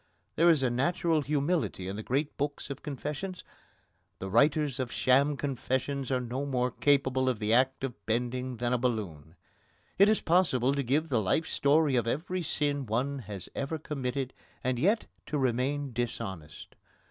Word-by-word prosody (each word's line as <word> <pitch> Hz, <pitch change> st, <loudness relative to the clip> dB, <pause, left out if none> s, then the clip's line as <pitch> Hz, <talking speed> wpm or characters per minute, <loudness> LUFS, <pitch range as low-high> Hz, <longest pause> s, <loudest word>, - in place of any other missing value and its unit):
There 170 Hz, +2 st, +5 dB
is 155 Hz, -5 st, +4 dB
a 125 Hz, -, +2 dB
natural 160 Hz, +5 st, +1 dB
humility 145 Hz, -, -1 dB
in 95 Hz, -, -4 dB
the 110 Hz, -, -4 dB
great 140 Hz, +6 st, -1 dB
books 145 Hz, 0 st, -3 dB
of 135 Hz, -, -6 dB
confessions: 150 Hz, +6 st, -5 dB, 0.7 s
the 95 Hz, 0 st, -6 dB
writers 145 Hz, +3 st, +3 dB
of 125 Hz, -2 st, -2 dB
sham 140 Hz, +3 st, +3 dB
confessions 135 Hz, 0 st, -2 dB
are 130 Hz, -, +2 dB
no 125 Hz, +2 st, -3 dB
more 125 Hz, -3 st, 0 dB
capable 130 Hz, -2 st, +2 dB
of 125 Hz, -, 0 dB
the 105 Hz, +1 st, 0 dB
act 130 Hz, +2 st, +2 dB
of 130 Hz, -3 st, -5 dB
bending 125 Hz, +2 st, -1 dB
than 120 Hz, +1 st, 0 dB
a 125 Hz, -, +2 dB
balloon. 90 Hz, -, -3 dB, 0.6 s
It 200 Hz, +1 st, +7 dB
is 215 Hz, -, +3 dB
possible 150 Hz, -7 st, +2 dB
to 140 Hz, -, 0 dB
give 145 Hz, +5 st, 0 dB
the 120 Hz, -5 st, +2 dB
life 110 Hz, -, +1 dB
story 145 Hz, 0 st, +3 dB
of 120 Hz, -2 st, +1 dB
every 180 Hz, +8 st, -1 dB
sin 145 Hz, -4 st, -1 dB
one 130 Hz, +6 st, -1 dB
has 100 Hz, -5 st, -8 dB
ever 140 Hz, +4 st, -3 dB
committed 135 Hz, -3 st, -3 dB, 0.3 s
and 125 Hz, -1 st, 0 dB
yet 205 Hz, -, +2 dB, 0.2 s
to 150 Hz, -, -1 dB
remain 135 Hz, +1 st, 0 dB
dishonest. 95 Hz, -9 st, -5 dB
135 Hz, 170 wpm, -29 LUFS, 120-145 Hz, 0.7 s, It